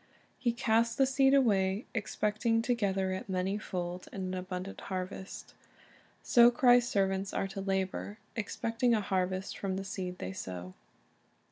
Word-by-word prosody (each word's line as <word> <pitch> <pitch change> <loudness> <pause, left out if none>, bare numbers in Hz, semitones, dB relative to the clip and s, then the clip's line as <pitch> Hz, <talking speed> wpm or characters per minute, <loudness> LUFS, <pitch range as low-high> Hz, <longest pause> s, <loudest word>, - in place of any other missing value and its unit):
He 240 - +1
casts 230 0 +2
the 270 - +4
seed 270 +1 +4
away, 200 -5 +2
expecting 220 +1 0
to 245 - +2
gather 195 -4 0
it 190 +1 -5
many 190 +2 -1
fold 180 -2 -4
in 195 - -5
an 185 0 -3
abundant 185 +1 -5
harvest. 190 0 -6 0.7
So 240 -2 +7
Christ's 245 0 +5
servants 195 -1 0
are 195 - 0
to 195 0 -5
labor, 195 +1 -2 0.2
expecting 230 +2 0
a 215 - +1
harvest 185 0 -1
from 195 -2 -2
the 195 - -3
seed 185 -1 -4
they 95 - -5
sow. 90 -1 -6
195 Hz, 150 wpm, -31 LUFS, 185-230 Hz, 0.7 s, So